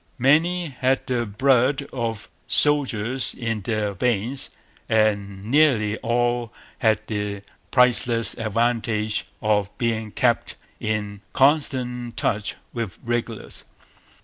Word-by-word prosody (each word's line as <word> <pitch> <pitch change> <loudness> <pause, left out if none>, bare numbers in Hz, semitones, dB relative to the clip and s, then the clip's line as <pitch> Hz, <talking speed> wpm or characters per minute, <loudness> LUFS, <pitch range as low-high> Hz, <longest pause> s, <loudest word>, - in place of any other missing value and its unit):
Many 160 +6 +3
had 130 0 0
the 120 -3 -1
blood 130 +5 +2
of 115 -4 -3 0.2
soldiers 130 -4 +2
in 115 -3 -2
their 105 0 -1
veins; 120 +5 -1 0.4
and 100 -3 +1
nearly 120 -5 +3
all 120 0 0 0.3
had 110 -2 +3
the 105 -2 -3 0.3
priceless 120 -2 +3
advantage 110 -1 -1 0.2
of 105 -2 +2
being 115 -3 -1
kept 120 +1 +1 0.2
in 105 -2 -3
constant 125 -4 +1
touch 105 -1 -1 0.2
with 115 -6 -4
regulars. 120 -2 -3
115 Hz, 100 wpm, -23 LUFS, 105-125 Hz, 0.4 s, Many